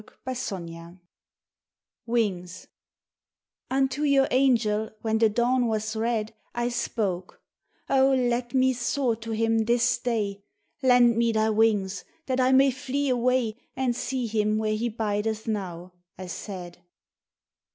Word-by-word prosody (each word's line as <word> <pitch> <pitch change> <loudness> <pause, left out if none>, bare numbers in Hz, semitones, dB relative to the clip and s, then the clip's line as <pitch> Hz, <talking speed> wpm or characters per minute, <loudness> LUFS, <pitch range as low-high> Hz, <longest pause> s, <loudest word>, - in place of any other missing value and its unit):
57 180 -9 -6 1.1
Mings 190 -6 -2 1.0
NTO 270 +2 +1
your 270 -1 +4
angel, 225 -5 +2
when 220 -1 +1
the 225 -1 +5
dawn 245 +3 +1
was 220 0 -2
red, 220 -1 -1 0.2
I 240 0 0
spoke, 195 -6 -3 0.5
"O, 270 0 +4
let 245 -1 0
me 260 0 +4
soar 245 0 0
to 230 0 -9
him 225 0 +1
this 240 +1 +2
day! 205 -5 -2 0.4
Lend 245 -3 +5
me 235 0 +3
thy 220 0 +2
wings, 210 -3 +1 0.2
that 260 -1 -1
I 255 0 +3
may 270 +1 +5
flee 270 +2 -2
away 250 -2 +1 0.2
And 255 -2 0
see 250 0 -2
him 215 -1 0
where 215 0 0
he 235 +3 -1
bideth 220 0 -2
now," 185 -4 -4 0.2
I 185 - -7
said. 180 -1 -7
230 Hz, 130 wpm, -26 LUFS, 210-250 Hz, 1.1 s, the